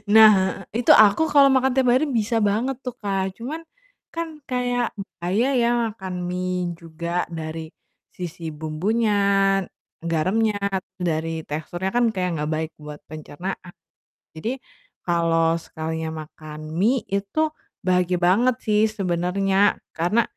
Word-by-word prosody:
nah 200 -3 +6
Itu 235 +1 +3
aku 215 +8 +6
kalau 280 -1 +7
makan 265 0 +3
tiap 265 -2 +3
hari 260 +5 +3
bisa 225 +2 0
banget 240 +7 0
tuh, 250 - -4
Kak, 195 -2 -1
cuman 285 +8 -5 0.5
kan 335 0 -2 0.2
kayak 245 -1 0 0.3
bahaya 190 +8 +1
ya 235 - +3 0.2
makan 190 -4 -7
mie 180 -1 -2
juga 170 +1 -3
dari 160 0 -5 0.5
sisi 165 -2 -6
bumbunya, 180 +9 0 0.9
garamnya, 190 +7 +1 0.5
dari 160 0 -2
teksturnya 175 +5 -3
kan 245 - +4
kayak 180 -2 -1
nggak 150 +1 -2
baik 160 +1 -3
buat 150 -1 -10
pencernaan, 175 +4 -7 0.6
jadi 235 +11 -4 0.4
kalau 165 -1 +2
sekalinya 160 0 -4 0.2
makan 155 0 -10
mie 235 +6 +3
itu 200 +11 0 0.4
bahagia 180 -1 +2
banget 230 +8 +4
sih 210 -1 +3
sebenarnya, 195 0 +1 0.2
karena 195 +8 +3
185 Hz, 125 wpm, -23 LUFS, 165-225 Hz, 0.9 s, kalau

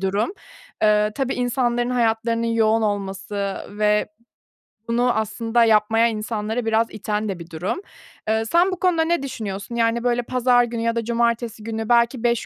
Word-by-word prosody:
durum. 200 - 0 0.5
Eee, 210 0 +3
tabii 265 -2 -1
insanların 245 -1 0
hayatlarının 230 -1 +1
yoğun 225 -1 +2
olması 200 -1 -2 0.2
ve 210 0 +2 0.8
bunu 240 +1 +2
aslında 225 +2 +1
yapmaya 225 +1 +4
insanları 220 +1 -3
biraz 225 +1 +2
iten 210 0 -3
de 185 -3 -4
bir 170 0 -10
durum. 180 - -3 0.5
Eee, 220 +1 +1
sen 350 +9 +3
bu 370 - -4
konuda 345 -3 +2
ne 335 -3 0
düşünüyorsun? 210 -4 -5
Yani, 230 0 +1
böyle, 245 0 +1
pazar 250 0 +3
günü 235 -1 -3
ya 230 0 0
da 230 - -1
cumartesi 235 -1 -1
günü 225 0 -4
belki 235 +1 +3
5 235 -1 +1
230 Hz, 160 wpm, -22 LUFS, 215-240 Hz, 0.8 s, yapmaya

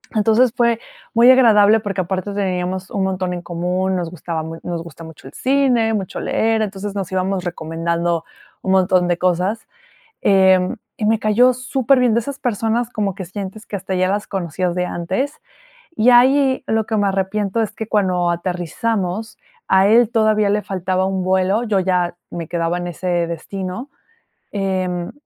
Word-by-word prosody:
Entonces, 220 +3 +3
fue 235 -2 +2 0.4
muy 240 +2 +7
agradable 220 -4 +5
porque 200 -3 -2
aparte 190 +2 -3
teníamos 185 -1 -2
un 195 - -1
montón 185 -1 -1
en 175 - -5
común, 180 +2 -1
nos 175 -2 -3
gustaba 165 -1 -4
mu 165 +1 -7
nos 170 -2 -4
gusta 165 -1 -11
mucho 160 -4 -12
el 135 - -12
cine, 255 -4 +2
mucho 195 -3 -4
leer, 225 0 +1
entonces 200 0 -5
nos 195 -3 -4
íbamos 190 0 -1
recomendando 170 0 -2 0.4
un 190 - -1
montón 185 -1 +3
de 175 -1 +1
cosas. 185 +5 0 0.6
Eh, 190 0 +4 0.2
y 215 - -1
me 220 +1 +3
cayó 225 +4 +4
superbién, 255 -1 +2
de 235 - +3
esas 275 +4 -6
personas 230 -1 -1
como 205 -5 -2
que 190 - -5
sientes 195 +4 -7
que - - -9
hasta 190 0 -4
ya 185 0 +2
las 205 +2 -1
conocías 180 -1 -2
de 180 0 0
antes. 190 - -3 0.6
Y 240 -2 +4
ahí, 260 +2 +4
lo 220 -1 +1
que 220 - -1
me 205 -1 +2
arrepiento 195 +2 -1
es 220 - -2
que 220 - -6
cuando 185 -5 +1
aterrizamos, 185 +4 -3 0.3
a 190 +1 +4
él 230 +1 +5
todavía 215 -2 +2
le 210 +1 +1
faltaba 185 0 -1
un 190 -1 -1
vuelo, 190 +4 +1
yo 210 -4 +1
ya 180 -2 0 0.2
me 170 -2 -5
quedaba 170 +1 -1
en 175 - -4
ese 175 0 -1
destino. 185 - -6 0.6
Em, 185 -3 -2
190 Hz, 170 wpm, -19 LUFS, 180-220 Hz, 0.6 s, muy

